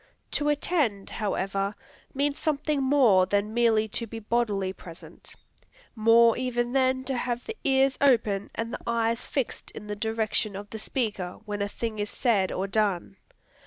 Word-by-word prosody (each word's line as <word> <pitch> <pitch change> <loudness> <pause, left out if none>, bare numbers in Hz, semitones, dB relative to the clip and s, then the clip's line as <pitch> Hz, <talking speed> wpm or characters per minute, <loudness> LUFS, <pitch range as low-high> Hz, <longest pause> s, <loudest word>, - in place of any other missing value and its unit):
To 295 0 +1
attend, 290 - 0
however, 195 -1 -1 0.4
means 280 +1 -1
something 300 -1 0
more 255 -9 +5
than 205 +2 0
merely 225 -2 +3
to 230 +2 -3
be 225 - -7
bodily 210 -4 0
present, 170 -3 -11 0.6
more 230 +1 +6
even 240 -1 -1
than 260 -1 +2
to 265 0 -2
have 240 0 -2
the 450 - -5
ears 270 -1 +3
open 220 -7 +3
and 230 +1 -3
the - - -5
eyes 230 0 0
fixed 270 -4 -3
in 210 - -9
the 210 0 -4
direction 220 -1 -1
of 205 +1 -8
the 220 - -6
speaker, 210 -7 -3
when 205 -1 -4
a 200 - 0
thing 220 0 -4
is 205 0 -2
said, 210 -7 +1
or 190 - -2
done. 195 -2 0
225 Hz, 160 wpm, -27 LUFS, 205-255 Hz, 0.6 s, more